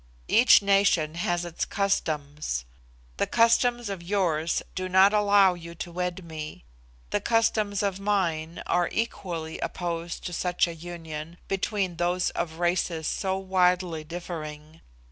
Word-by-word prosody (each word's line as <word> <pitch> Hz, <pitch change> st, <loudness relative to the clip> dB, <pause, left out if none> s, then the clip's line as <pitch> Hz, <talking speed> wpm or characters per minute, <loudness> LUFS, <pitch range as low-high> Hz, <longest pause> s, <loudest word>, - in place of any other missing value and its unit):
Each 235 Hz, -3 st, +6 dB
nation 195 Hz, -6 st, +3 dB
has 175 Hz, +1 st, -1 dB
its 170 Hz, -1 st, -3 dB
customs. 150 Hz, -, -1 dB, 0.5 s
The -, -, +1 dB
customs 240 Hz, 0 st, +3 dB
of 195 Hz, -3 st, -4 dB
yours 170 Hz, -4 st, 0 dB
do 185 Hz, 0 st, -3 dB
not 190 Hz, +2 st, +6 dB
allow 205 Hz, -2 st, +5 dB
you 170 Hz, -1 st, -9 dB
to 175 Hz, -, -6 dB
wed 180 Hz, +1 st, -3 dB
me; 155 Hz, -, -7 dB, 0.5 s
the -, -, +1 dB
customs 215 Hz, -3 st, +1 dB
of 195 Hz, -1 st, -1 dB
mine 170 Hz, -5 st, -1 dB
are 175 Hz, -1 st, +1 dB
equally 175 Hz, -8 st, -3 dB
opposed 170 Hz, -1 st, -4 dB
to 175 Hz, -, -4 dB
such 180 Hz, +1 st, +1 dB
a 170 Hz, -, -5 dB
union 165 Hz, -1 st, -7 dB
between 195 Hz, -2 st, -1 dB
those 175 Hz, +1 st, +1 dB
of 165 Hz, -2 st, -3 dB
races 175 Hz, -2 st, 0 dB
so 190 Hz, -1 st, -1 dB
widely 180 Hz, -3 st, +1 dB
differing. 155 Hz, -2 st, -7 dB
175 Hz, 135 wpm, -27 LUFS, 165-195 Hz, 0.5 s, Each